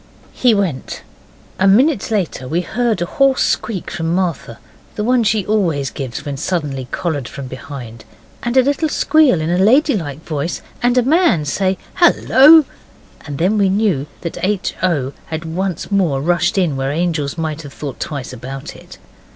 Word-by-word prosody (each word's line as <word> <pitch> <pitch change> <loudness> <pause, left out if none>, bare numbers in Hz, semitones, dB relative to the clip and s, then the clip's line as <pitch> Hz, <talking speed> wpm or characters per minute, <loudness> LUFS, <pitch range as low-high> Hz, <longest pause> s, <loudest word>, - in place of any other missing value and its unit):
He 245 -3 +3
went. 185 -10 -3 0.6
A 190 - +4
minute 245 +5 +3
later 185 - -2
we 165 +6 0
heard 225 -1 -1
a - - -1
hoarse 270 +8 +2
squeak 200 -6 -2
from 165 -2 -2
Martha 170 -11 -2 0.4
the 210 - -2
one 245 +1 +2
she 215 -2 +1
always 170 -11 0
gives 130 -4 -6
when 140 -2 -4
suddenly 145 -5 -3
collared 145 -8 -3
from 140 -2 -8
behind 130 -3 -9 0.4
and 240 +2 -1
a 260 - +7
little 285 +4 0
squeal 300 - +3
in 160 +2 -1
a 175 - +1
lady 260 +8 +4
like 150 -5 -5
voice, 155 +1 -3 0.2
and 245 +1 +2
a 250 - +4
man 300 - +3
say 190 +5 0 0.2
'Hallo!' 315 -3 +6 0.6
and 145 -1 -5
then 190 +7 +1
we 195 -1 +3
knew 190 -8 +1
that 170 - -6
H. 195 0 0
O. 145 -7 0
had 160 0 -5
once 180 +3 -3
more 175 -9 +1
rushed 175 +5 +1
in 175 -7 +1
where 135 +1 -2
angels 155 -2 -1
might 160 -1 -3
have 145 -3 -10
thought 140 -4 -7
twice 140 -4 -5
about 130 +2 -8
it. - - -14
175 Hz, 175 wpm, -17 LUFS, 145-215 Hz, 0.6 s, a